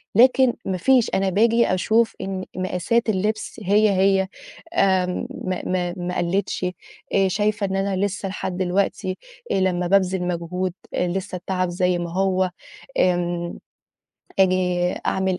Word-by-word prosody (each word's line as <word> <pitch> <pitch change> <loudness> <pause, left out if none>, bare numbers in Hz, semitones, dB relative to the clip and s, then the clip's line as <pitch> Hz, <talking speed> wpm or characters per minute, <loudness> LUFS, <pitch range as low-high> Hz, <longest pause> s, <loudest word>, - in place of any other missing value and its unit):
لكن 250 +2 +5
ما 190 -1 -1
فيش، 250 +5 +3
أنا 195 0 +1
باجي 230 +5 +3
أشوف 220 +5 +2
إن 190 -1 -4
مقاسات 185 +6 0
اللبس 215 +3 -1
هي، 210 +3 +4
هي 190 0 +3 0.5
آمم 185 -2 +1
ما 185 -1 -4
ما 180 -1 -1
ما 180 0 -3
قلّتش، 185 +2 -1 0.5
آآ 195 - +4
شايفة 210 +2 0
إن 190 - -2
أنا 195 0 0
لسّه 200 0 -3
لحد 185 -1 -4
الوقتي 185 +1 0 0.3
آآ - - +2
لمّا 180 -1 +1
بابذل 190 -1 +2
مجهود 180 +1 -2 0.2
آآ 180 - +1
لسّه 190 +2 -3
التعب 185 0 -2
زي 180 0 +1
ما 170 -1 -4
هو، 185 -1 +1 0.5
آمم 175 -1 0 0.8
آجي 180 -1 +2
أعمل 190 -1 0
185 Hz, 140 wpm, -23 LUFS, 180-200 Hz, 0.8 s, لكن